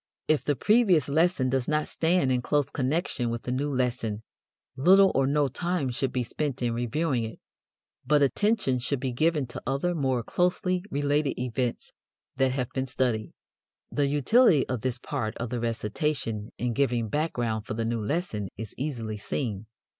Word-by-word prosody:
If 155 Hz, -1 st, +2 dB
the 145 Hz, -, +1 dB
previous 205 Hz, -, +4 dB
lesson 160 Hz, -2 st, +2 dB
does 130 Hz, -1 st, 0 dB
not 150 Hz, 0 st, +1 dB
stand 165 Hz, -4 st, +2 dB
in 125 Hz, -1 st, +1 dB
close 145 Hz, +2 st, 0 dB
connection 135 Hz, -2 st, 0 dB
with 115 Hz, 0 st, -4 dB
the 125 Hz, -, -3 dB
new 140 Hz, +3 st, -1 dB
lesson 120 Hz, -5 st, -1 dB, 0.5 s
little 190 Hz, +7 st, +6 dB
or 135 Hz, 0 st, +2 dB
no 145 Hz, 0 st, +2 dB
time 170 Hz, 0 st, -1 dB
should 130 Hz, +2 st, -1 dB
be 125 Hz, -, -1 dB
spent 135 Hz, +1 st, -3 dB
in 120 Hz, -1 st, +1 dB
reviewing 120 Hz, +2 st, 0 dB
it, 110 Hz, 0 st, -7 dB, 0.6 s
but 150 Hz, -1 st, +3 dB
attention 140 Hz, -, +1 dB
should 125 Hz, +2 st, -2 dB
be 130 Hz, 0 st, -2 dB
given 155 Hz, +3 st, +1 dB
to 120 Hz, -, -8 dB
other 140 Hz, +7 st, 0 dB
more 130 Hz, -6 st, 0 dB
closely 180 Hz, +4 st, 0 dB
related 145 Hz, -1 st, 0 dB
events 125 Hz, -1 st, -2 dB, 0.4 s
that 130 Hz, -1 st, +3 dB
have 125 Hz, -3 st, -2 dB
been 130 Hz, 0 st, -2 dB
studied. 120 Hz, -4 st, -1 dB, 0.6 s
The 145 Hz, -1 st, +1 dB
utility 150 Hz, -, +4 dB
of 125 Hz, -3 st, -2 dB
this 130 Hz, +1 st, -1 dB
part 120 Hz, -4 st, -4 dB
of 120 Hz, 0 st, -4 dB
the 125 Hz, -, -1 dB
recitation 115 Hz, 0 st, -2 dB
in 120 Hz, -1 st, -1 dB
giving 120 Hz, -3 st, +1 dB
background 115 Hz, -5 st, -1 dB
for -, -, -3 dB
the 115 Hz, 0 st, -1 dB
new 115 Hz, -1 st, -1 dB
lesson 110 Hz, -, -2 dB
is 110 Hz, -1 st, -7 dB
easily 115 Hz, -7 st, -3 dB
seen. 105 Hz, -1 st, -3 dB
130 Hz, 170 wpm, -27 LUFS, 120-150 Hz, 0.6 s, little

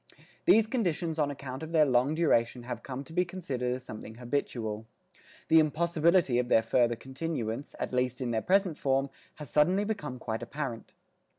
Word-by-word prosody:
These 220 Hz, -1 st, +6 dB
conditions 175 Hz, -, -1 dB
on 145 Hz, -2 st, +2 dB
account 135 Hz, -2 st, -6 dB
of 160 Hz, +1 st, -7 dB
their 155 Hz, -2 st, +6 dB
long 130 Hz, +3 st, +2 dB
duration 125 Hz, -7 st, +2 dB
have 120 Hz, -1 st, -5 dB
come 135 Hz, +2 st, -6 dB
to 160 Hz, -, -13 dB
be 180 Hz, +1 st, +3 dB
considered 135 Hz, -9 st, -3 dB
as 130 Hz, -, -8 dB
something 110 Hz, -2 st, -9 dB
habitual. 115 Hz, -3 st, -3 dB, 0.6 s
The 160 Hz, -, +6 dB
impossibility 165 Hz, -2 st, +3 dB
of 125 Hz, -, 0 dB
their 115 Hz, -2 st, +4 dB
further 120 Hz, +1 st, +2 dB
continuance, 130 Hz, -1 st, -4 dB
at -, -, -3 dB
least 125 Hz, 0 st, 0 dB
in 125 Hz, -3 st, -2 dB
their 110 Hz, -1 st, 0 dB
present 185 Hz, -, +2 dB
form, 135 Hz, 0 st, +1 dB, 0.2 s
has 150 Hz, -5 st, -9 dB
suddenly 180 Hz, +7 st, +3 dB
become 150 Hz, -12 st, -4 dB
quite 115 Hz, -2 st, -4 dB
apparent. 120 Hz, -1 st, -5 dB
135 Hz, 175 wpm, -30 LUFS, 120-160 Hz, 0.6 s, These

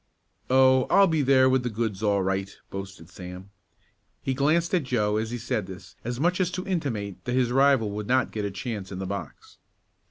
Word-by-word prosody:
"Oh, 130 Hz, 0 st, +5 dB
I'll 200 Hz, +1 st, +6 dB
be 160 Hz, -4 st, +1 dB
there 130 Hz, -1 st, +5 dB
with 130 Hz, 0 st, +3 dB
the 125 Hz, -, -2 dB
goods 110 Hz, -3 st, -3 dB
all 100 Hz, -2 st, +2 dB
right," 95 Hz, +1 st, -2 dB
boasted 95 Hz, -4 st, -7 dB
Sam. 90 Hz, +2 st, -10 dB, 0.7 s
He 135 Hz, -, 0 dB
glanced 155 Hz, +6 st, +1 dB
at 180 Hz, -, +3 dB
Joe 105 Hz, -5 st, +1 dB
as 110 Hz, +1 st, -2 dB
he 120 Hz, -, -4 dB
said 110 Hz, -4 st, -2 dB
this 95 Hz, -1 st, -11 dB
as 120 Hz, +1 st, -4 dB
much 180 Hz, +4 st, +1 dB
as 180 Hz, -, +1 dB
to 185 Hz, 0 st, -4 dB
intimate 115 Hz, -, -3 dB
that 125 Hz, 0 st, -1 dB
his 125 Hz, -2 st, +2 dB
rival 135 Hz, -5 st, +3 dB
would 105 Hz, 0 st, -5 dB
not 130 Hz, +1 st, +2 dB
get 105 Hz, -, -3 dB
a 100 Hz, -, -1 dB
chance 100 Hz, 0 st, -5 dB
in 95 Hz, -, -5 dB
the 95 Hz, -, -4 dB
box. 100 Hz, +1 st, -7 dB
120 Hz, 210 wpm, -26 LUFS, 100-135 Hz, 0.7 s, I'll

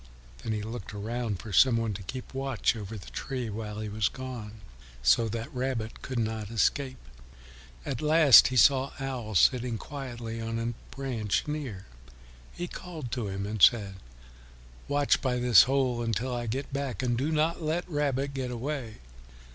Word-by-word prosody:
Then 115 Hz, -, -3 dB
he 105 Hz, -1 st, -3 dB
looked 110 Hz, -2 st, -7 dB
around 110 Hz, 0 st, -3 dB
for 110 Hz, -, -8 dB
some 125 Hz, +1 st, +6 dB
one 115 Hz, -2 st, -1 dB
to 95 Hz, -, -7 dB
keep 130 Hz, +8 st, -7 dB
watch 135 Hz, -3 st, 0 dB
over 110 Hz, 0 st, -6 dB
the 95 Hz, -, -11 dB
tree 125 Hz, -4 st, -4 dB
while 105 Hz, 0 st, -5 dB
he 110 Hz, -, -4 dB
was 105 Hz, -1 st, 0 dB
gone, 115 Hz, -5 st, -8 dB, 0.4 s
so 70 Hz, -, +4 dB
that 115 Hz, +7 st, -5 dB
Rabbit 125 Hz, -3 st, -3 dB
could 130 Hz, -, -5 dB
not 110 Hz, -2 st, -2 dB
escape. 130 Hz, +4 st, 0 dB, 0.9 s
At 130 Hz, -4 st, -3 dB
last 155 Hz, -3 st, +8 dB
he 130 Hz, -, -2 dB
saw 135 Hz, +2 st, +5 dB
Owl 125 Hz, -6 st, -4 dB
sitting 125 Hz, +3 st, +3 dB
quietly 120 Hz, -5 st, -6 dB
on 115 Hz, 0 st, -3 dB
a 115 Hz, +1 st, -2 dB, 0.2 s
branch 125 Hz, -6 st, -1 dB
near. 135 Hz, -11 st, -4 dB, 0.7 s
He 175 Hz, -, -5 dB
called 160 Hz, -9 st, -7 dB
to 120 Hz, -4 st, -2 dB
him 95 Hz, 0 st, -4 dB
and 105 Hz, 0 st, -4 dB
said, 100 Hz, -4 st, +5 dB, 0.9 s
"Watch 145 Hz, 0 st, +2 dB
by 125 Hz, -2 st, 0 dB
this 120 Hz, -3 st, +7 dB
hole 130 Hz, -3 st, +1 dB
until 115 Hz, +2 st, -1 dB
I 120 Hz, -1 st, -3 dB
get 135 Hz, +5 st, -4 dB
back, 140 Hz, -2 st, -3 dB
and 120 Hz, -1 st, +1 dB
do 140 Hz, +6 st, -1 dB
not 160 Hz, +2 st, +1 dB
let 160 Hz, +3 st, -1 dB
Rabbit 140 Hz, -3 st, -1 dB
get 130 Hz, -2 st, -3 dB
away." 125 Hz, -2 st, -4 dB
120 Hz, 170 wpm, -28 LUFS, 110-135 Hz, 0.9 s, last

